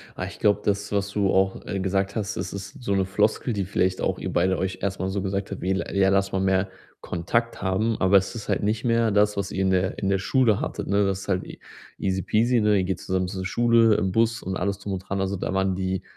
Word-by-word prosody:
Ah, 90 - -4
ich 100 +2 -9
glaube, 105 -1 +3
das, 100 0 -1
was 100 -1 0
du 100 -2 +1
auch, 95 0 +1
äh, 100 - -3
gesagt 95 +1 -1
hast, 100 -2 -2
das - - -4
ist 100 +4 -8
so 100 - 0
'ne 95 -1 +2
Floskel, 105 +5 0
die 100 -2 -1
vielleicht 95 0 0
auch - - -1
ihr - - -4
beide 95 +1 +2
euch 95 +2 -3
erst 100 0 -2
mal 95 - -1
so 95 +1 -2
gesagt 100 +1 -3
habt, 100 - -5
wie: 95 - 0
„L 95 +1 -2
ja, 95 -1 +4
lass 95 0 +1
mal 95 - +1
mehr 95 0 +1 0.3
Kontakt 115 +7 -2
haben.“ 100 +4 0
Aber 95 +1 +6
es 95 +5 -1
ist 110 - -7
halt - - +1
nicht 110 +3 -1
mehr 115 -2 +2
das, 105 0 +2
was 100 0 -2
ihr 95 - -2
in 95 - +2
der 95 0 +1
in 95 - -1
der 100 - +2
Schule 110 +2 +2
hattet, - - -4
ne? 100 +1 +3
Das 95 -1 -1
ist - - -10
halt 95 -1 +1 0.5
easy-peasy, 110 +6 +1
ne? 105 -1 +3
Ihr 95 - +1
geht 95 +1 -2
zusammen 95 -1 -1
zur 95 0 -5
Schule, 115 +1 +4
im 95 -2 0
Bus 115 +3 +1
und 95 0 -3
alles 100 +1 -2
drum 100 -1 -5
und 95 - -2
dran. 100 0 -2
Also, 95 0 -1
da 95 - -3
waren 95 -1 +1
die 95 0 -2
100 Hz, 265 wpm, -25 LUFS, 95-105 Hz, 0.5 s, Aber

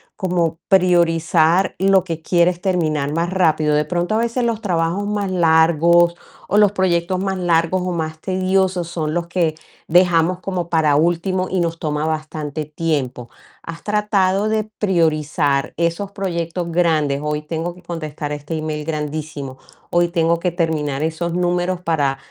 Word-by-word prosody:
como 175 -3 -1
priorizar 175 -1 +3
lo 190 -1 +3
que 165 -3 -5
quieres 175 0 +2
terminar 155 -6 0
más 170 +2 0
rápido. 160 -5 +2
De 150 0 +1
pronto, 175 +5 -1
a - - +3
veces, 235 +2 0
los 230 -2 -1
trabajos 175 0 -1
más 205 -1 -1
largos, 170 0 +4 0.3
o 205 - +1
los 210 -2 +5
proyectos 185 -2 0
más 190 0 -2
largos 175 0 +1
o 180 - -1
más 160 -2 -3
tediosos 185 -1 0
son 155 -3 -3
los 170 0 -2
que 170 -3 0 0.3
dejamos 175 0 +3
como 180 -2 -4
para 155 -4 +3
último 175 +4 +1
y 190 - 0
nos 165 -1 -1
toma 150 -1 -2
bastante 155 -1 -4
tiempo. 145 -6 -3 0.3
Has 165 0 -9
tratado 205 -1 +1
de 220 0 +1 0.2
priorizar 155 -6 +1
esos 170 +4 -1
proyectos 170 -3 -3
grandes, 155 -5 +1
hoy 150 0 -2
tengo 165 +2 -4
que 180 - -17
contestar 155 -3 -5
este 150 +2 -5
email 155 -1 -4
grandísimo, 150 -3 -4 0.3
hoy 175 0 +3
tengo 170 -1 +1
que 180 +1 -1
terminar 155 -4 -1
esos 165 +2 -2
números 175 0 0
para 145 -6 0
170 Hz, 155 wpm, -19 LUFS, 155-185 Hz, 0.3 s, los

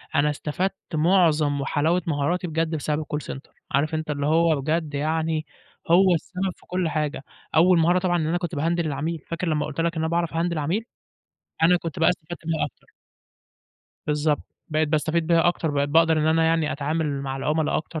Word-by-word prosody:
أنا 150 0 +3
استفدت 150 +6 -2 0.2
معظم 155 -3 +3
وحلاوة 160 +6 +1
مهاراتي 165 +4 0
بجد 160 0 -1
بسبب 150 0 -1
الcall 150 - -4 0.2
center. 135 - -13 0.2
عارف 145 +3 +1
أنت 155 -1 -3
اللي 145 -1 -2
هو 160 -1 +3
بجد 155 +1 -1
يعني 155 +2 -1 0.5
هو 185 +1 +6
السبب 185 +3 -2
في - - -24
كل 180 -2 -1
حاجة. 150 -3 -2 0.3
أول 170 +2 +5
مهارة 175 +3 +3
طبعًا 180 -1 +1
إن 155 - -1
أنا 170 +2 +1
كنت 175 -1 -4
باهندِل 165 +3 0
العميل، 155 +3 -2
فاكر 170 +2 -3
لمّا 150 -2 0
قُلت 155 +2 -3
لك 170 0 0
إن 160 - -1
أنا 160 - 0
باعرف 170 -1 0
أهندل 170 +1 0
العميل؟ 170 +9 -1 0.8
أنا 180 +2 +6
كنت 165 -3 -5
بقى 165 - +4
استفدت 170 -1 -4
بيها 160 -2 0
أكتر. 140 - -18 1.1
بالضبط. 150 0 +1 0.3
بقيت 155 0 +1
باستفيد 160 +2 0
بيها 170 0 +4
أكتر، 165 -3 -1
بقيت 140 0 0
باقدر 160 +1 +4
إن 155 - +1
أنا 160 +1 +3
يعني 160 -2 +2
أتعامل 145 -1 -2
مع 135 -1 -3
العُملا 150 +3 0
أكتر، 160 0 -4
160 Hz, 190 wpm, -24 LUFS, 150-170 Hz, 1.1 s, هو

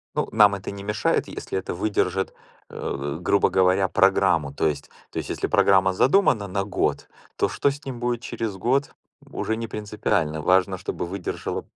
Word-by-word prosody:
Ну, - - 0
нам 105 -2 +6
это 95 -1 -6
не 100 0 -8
мешает, 105 +1 0
если 95 - -4
это 95 - -4
выдержит, 95 -1 -1 0.4
э, 70 +2 -4
грубо 100 +3 +2
говоря, 95 +1 +3
программу. 95 -7 +3
То 70 - 0
есть 75 -2 -2 0.2
то - - -5
есть - - -4
если - - -1
программа 95 -1 +4
задумана 125 - +3
на 100 +1 -1
год, 100 - -1 0.3
то - - +1
что 140 - +1
с 145 +3 -8
ним 130 -3 -6
будет 120 -1 -1
через 115 -4 -4
год, 135 +8 0 0.4
уже 110 - -2
не 115 - -4
принципиально. 105 -7 -1
Важно, 95 +3 +2
чтобы 90 - -4
выдержала 95 0 -4
100 Hz, 175 wpm, -24 LUFS, 90-110 Hz, 0.4 s, нам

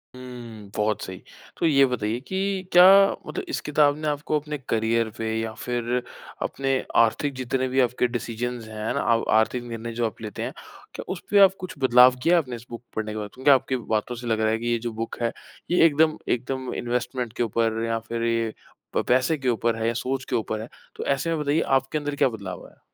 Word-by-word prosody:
हुँ, 120 -5 -10
बहुत 105 -1 0
सही। 95 0 -7 0.4
तो - - 0
ये 140 -4 +5
बताइए 115 -3 -2
कि 190 0 -1
क्या 180 0 +8 0.4
मतलब - - -4
इस - - -1
किताब 150 -1 +3
ने 155 - -3
आपको 150 +1 0
अपने 150 0 -5
करियर 115 0 +1
पे 110 0 -2
या 110 0 -3
फ़िर 120 0 -1 0.4
अपने 135 0 -1 0.3
आर्थिक 140 +5 0
जितने 130 0 -1
भी 130 +1 0
आपके 125 0 +1
डिसीज़न्स 120 -1 -4
हैं 110 +2 -3
ना 140 - -1
आव 115 - +1 0.2
आर्थिक 120 +2 0
निर्णय 115 -1 -6
जो 120 0 0
आप 110 - -10
लेते 105 -3 -5
हैं, - - -3 0.4
क्या - - -6
उस 180 - -10
पे 205 - +6
आप 190 - +6
कुछ 185 0 -6
बदलाव 125 0 +7
किया 175 +1 +5
आपने 130 -7 -1
इस 115 0 -11
बुक 120 0 -8
पढ़ने 110 -1 -2
के 110 - -5
बाद? 105 -1 -4
क्योंकि 130 +3 +3
आपकी 130 -1 +3 0.2
बातों 110 +3 -2
से 120 0 -7
लग 110 -1 +1
रहा 110 - +3
है 110 - +1
कि 120 - -4
ये 120 -1 +1
जो 120 - -1
बुक 115 - -4
है 115 -1 +1 0.4
ये 180 - +5
एकदम 155 0 +3 0.2
एकदम 130 +1 -3
इन्वेस्टमेंट 125 -1 -2
के 120 - +2
ऊपर 115 0 0
या 115 0 -1
फ़िर 115 +1 -4
ये 115 -1 0 0.4
प - - +2
पैसे 130 +5 +3
के 130 -2 -1
ऊपर 115 0 +1
है 115 0 -1
या 115 - +1
सोच 130 +3 -3
के - - 0
ऊपर 110 -1 -2
है। 110 - -7 0.3
तो - - -5
ऐसे 140 +4 0
में 165 -1 0
बताइए 150 +2 +1 0.2
आपके 135 +3 -3
अंदर 145 -1 -3
क्या 135 - +3
बदलाव 100 -6 -7
आया? - - -18
120 Hz, 225 wpm, -25 LUFS, 115-135 Hz, 0.4 s, क्या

